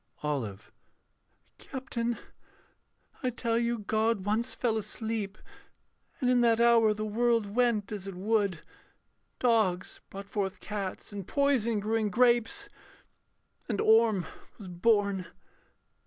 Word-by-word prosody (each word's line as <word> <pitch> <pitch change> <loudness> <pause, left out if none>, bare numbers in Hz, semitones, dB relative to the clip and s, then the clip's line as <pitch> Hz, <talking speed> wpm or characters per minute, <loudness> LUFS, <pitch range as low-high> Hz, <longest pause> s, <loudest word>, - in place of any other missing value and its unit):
OLIVE. 115 -9 -3 0.9
Captain, 240 -3 -3 1.0
I 255 - +1
tell 230 -1 -1
you 235 0 0
God 220 -1 0
once 220 +4 0
fell 235 -3 0
asleep. 215 -1 -3 0.8
And 255 - 0
in 250 -1 +4
that 230 -1 +4
hour 235 -2 +5
the 215 +1 -3
world 230 +1 +2
went 235 -5 +2
as 200 -2 -5
it 195 - -6
would; 200 -3 0 0.8
Dogs 215 -7 +1
brought 195 +1 -8
forth 195 -2 -3
cats, 205 -1 -5
and 200 -3 -6
poison 260 -6 +2
grew 215 +2 0
in 215 -2 0
grapes, 240 +2 +2 1.0
And 210 -4 -1
Orm 220 -4 +4 0.3
was 200 -4 -9
born.... 200 0 +1
220 Hz, 120 wpm, -29 LUFS, 200-235 Hz, 1.0 s, hour